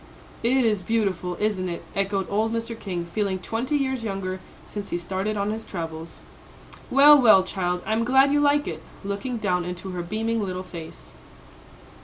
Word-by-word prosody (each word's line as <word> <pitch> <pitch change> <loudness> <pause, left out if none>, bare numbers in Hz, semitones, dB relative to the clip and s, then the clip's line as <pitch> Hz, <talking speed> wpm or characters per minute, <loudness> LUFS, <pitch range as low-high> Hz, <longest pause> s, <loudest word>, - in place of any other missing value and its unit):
"It 250 +2 +3
is 210 -4 +2
beautiful, 185 -4 -1
isn't 205 -4 0
it?" 170 - -5
echoed 195 -1 0
old 215 +2 0
Mr. 230 0 -2
King, 180 -4 -4
feeling 200 -3 0
twenty 230 +9 -2
years 265 -3 -1
younger 195 -3 -3 0.3
since 205 -1 -6
he - - -1
started 190 +4 -2
on 200 +1 0
his 220 +1 -4
travels. 165 -2 -6 0.7
"Well, 285 +2 +8
well, 215 -6 +7
child, 180 -1 -2
I'm 220 +2 +1
glad 265 +3 +5
you 290 - +3
like 290 0 +3
it," 160 -2 -5 0.2
looking 200 +5 -3
down 180 -5 0
into 180 +2 -6
her 180 -1 -3
beaming 220 +5 -1
little 185 -1 -3
face. 170 -3 -10
200 Hz, 170 wpm, -25 LUFS, 185-230 Hz, 0.7 s, Well